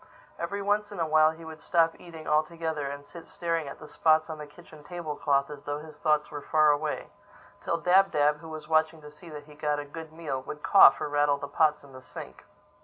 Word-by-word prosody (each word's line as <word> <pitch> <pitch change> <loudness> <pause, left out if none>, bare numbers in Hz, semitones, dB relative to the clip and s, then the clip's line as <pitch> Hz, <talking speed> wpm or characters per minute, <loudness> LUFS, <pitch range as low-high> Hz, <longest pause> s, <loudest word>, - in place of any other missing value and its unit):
Every 200 0 -3
once 205 +1 0
in 200 - -7
a 165 - +1
while 155 0 +5
he 160 +1 -9
would 160 -1 -10
stop 165 -3 +2
eating 165 -3 -11
altogether 155 -1 -1
and 140 +1 -7
sit 170 +1 -12
staring 165 -4 -2
at 140 - -8
the 155 - -12
spots 160 +1 +2
on 155 - -7
the 150 - -7
kitchen 155 0 -16
table 170 -2 -6
cloth 140 0 +1
as 145 -1 -9
though 145 0 -2
his 150 0 -12
thoughts 150 -2 +1
were 145 -1 -6
far 155 0 +4
away; 150 +1 -2 0.5
till 170 - 0
Dab 190 +3 +4
Dab, 150 -3 +2
who 160 - -11
was 155 -1 -8
watching 160 0 +2
to 150 - -11
see 165 +3 -13
that 150 -1 -8
he 150 0 -16
got 150 0 -1
a 145 - -5
good 160 +2 -9
meal, 155 -5 -4
would 150 +3 -9
cough 190 -8 +7
or - - -2
rattle 145 -1 +2
the 140 - -6
pots 150 +1 +2
in 140 -1 -16
the 130 - -11
sink. - - -10
155 Hz, 240 wpm, -28 LUFS, 145-165 Hz, 0.5 s, cough